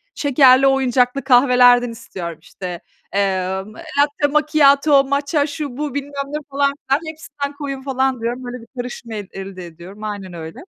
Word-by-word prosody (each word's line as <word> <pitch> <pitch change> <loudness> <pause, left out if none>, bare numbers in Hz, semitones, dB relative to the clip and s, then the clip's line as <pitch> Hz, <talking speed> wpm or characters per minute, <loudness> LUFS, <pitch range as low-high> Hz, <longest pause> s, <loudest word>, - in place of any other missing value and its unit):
şekerli, 270 -2 +5
oyuncaklı 265 0 +2
kahvelerden 245 -1 +5
istiyorum. 185 -8 -7
İşte, 175 0 -7 0.3
emm, 190 0 -1
latte 290 +1 0
macchiato, 290 -1 +4
matcha 280 +2 0
şu, 285 -3 -6
bu, 295 -2 -3
bilmem 285 0 -4 0.2
ne, 295 +2 -4
falan, 280 0 +1 0.2
filan 275 +2 +3
hepsinden 290 -2 -6
koyun 275 -2 -5
falan 265 -2 -1
diyorum. 240 +2 -3
Böyle 245 0 -7
bir 230 - -15
karışım 245 -1 -6
eld 205 -3 -5
elde 190 -2 -7
ediyorum, 175 +5 -12
aynen 200 -4 -5
öyle. 160 -1 -8
255 Hz, 150 wpm, -19 LUFS, 210-280 Hz, 0.3 s, şekerli